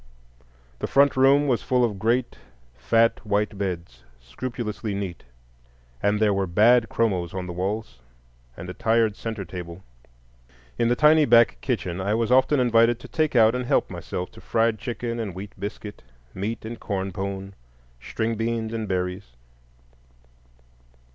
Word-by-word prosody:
The -, -, -2 dB
front 140 Hz, 0 st, +4 dB
room 135 Hz, +2 st, +4 dB
was 125 Hz, -4 st, +1 dB
full 125 Hz, -1 st, +2 dB
of 105 Hz, -4 st, -4 dB
great 120 Hz, +4 st, 0 dB, 0.4 s
fat 115 Hz, -, +2 dB
white 105 Hz, 0 st, 0 dB
beds, 85 Hz, -11 st, -5 dB, 0.2 s
scrupulously 105 Hz, -, -5 dB
neat; 95 Hz, -4 st, -5 dB, 0.8 s
and 105 Hz, +1 st, +1 dB
there 105 Hz, -2 st, +3 dB
were 95 Hz, -1 st, 0 dB
bad 115 Hz, +6 st, +4 dB
chromos 95 Hz, -7 st, -1 dB
on 95 Hz, -1 st, -3 dB
the 90 Hz, -, -6 dB
walls, 95 Hz, -, -4 dB, 0.6 s
and 90 Hz, -, -8 dB
a 90 Hz, -, -6 dB
tired 110 Hz, -1 st, +1 dB
centre 110 Hz, -4 st, -5 dB
table. 85 Hz, +1 st, -8 dB, 1.0 s
In 115 Hz, -, +3 dB
the 120 Hz, -, +2 dB
tiny 155 Hz, +2 st, +5 dB
back 115 Hz, -, +5 dB
kitchen 90 Hz, +1 st, -2 dB
I 100 Hz, +3 st, 0 dB
was 115 Hz, +1 st, 0 dB
often 130 Hz, +2 st, +4 dB
invited 115 Hz, -1 st, +3 dB
to -, -, -10 dB
"take 155 Hz, -3 st, -1 dB
out 115 Hz, -1 st, +6 dB
and 125 Hz, -1 st, -3 dB
help" -, -, +1 dB
myself 90 Hz, -, -5 dB
to -, -, -14 dB
fried 115 Hz, -1 st, +1 dB
chicken 120 Hz, -1 st, -4 dB
and 100 Hz, -6 st, -4 dB
wheat 100 Hz, +2 st, -7 dB
biscuit, 105 Hz, 0 st, -7 dB, 0.3 s
"meat" 105 Hz, +4 st, -4 dB
and 115 Hz, +1 st, -7 dB
corn 95 Hz, -2 st, -3 dB
pone, 95 Hz, +1 st, -5 dB, 0.5 s
string 110 Hz, -, -2 dB
beans 115 Hz, 0 st, -2 dB
and 110 Hz, -2 st, -3 dB
berries. 90 Hz, -5 st, -3 dB
110 Hz, 155 wpm, -24 LUFS, 95-115 Hz, 1.0 s, out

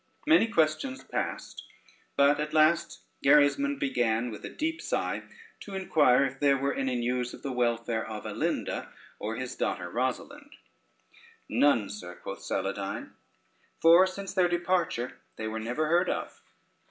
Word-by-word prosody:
Many 310 Hz, -7 st, +5 dB
questions 170 Hz, -, 0 dB
passed, -, -, -4 dB, 0.5 s
but 140 Hz, +1 st, +5 dB
at 150 Hz, +1 st, -3 dB
last 155 Hz, +2 st, +3 dB, 0.2 s
Gerismond 280 Hz, -, +4 dB
began 120 Hz, -, 0 dB
with 105 Hz, -, -9 dB
a -, -, -5 dB
deep 325 Hz, +1 st, -3 dB
sigh -, -, -2 dB, 0.4 s
to 200 Hz, -, -8 dB
inquire 145 Hz, -8 st, +4 dB
if 135 Hz, 0 st, -5 dB
there 140 Hz, -1 st, +4 dB
were 140 Hz, +1 st, 0 dB
any 130 Hz, -2 st, -1 dB
news 125 Hz, +1 st, -1 dB
of -, -, -17 dB
the 140 Hz, -, -3 dB
welfare 115 Hz, -2 st, 0 dB
of 110 Hz, -1 st, -7 dB
Alinda, -, -, -2 dB, 0.3 s
or -, -, -3 dB
his -, -, -5 dB
daughter 90 Hz, 0 st, -2 dB
Rosalynde? 275 Hz, -, -3 dB, 0.9 s
"None, 120 Hz, -8 st, +3 dB
sir," 90 Hz, -4 st, -8 dB
quoth -, -, -8 dB
Saladyne, -, -, -3 dB, 0.7 s
"for 170 Hz, +3 st, +7 dB
since 195 Hz, +1 st, -6 dB
their 185 Hz, -2 st, +3 dB
departure 175 Hz, -8 st, -1 dB, 0.2 s
they 110 Hz, -, -5 dB
were 110 Hz, 0 st, -3 dB
never 120 Hz, +8 st, -1 dB
heard 175 Hz, +4 st, +2 dB
of." -, -, -4 dB
145 Hz, 145 wpm, -28 LUFS, 120-180 Hz, 0.9 s, for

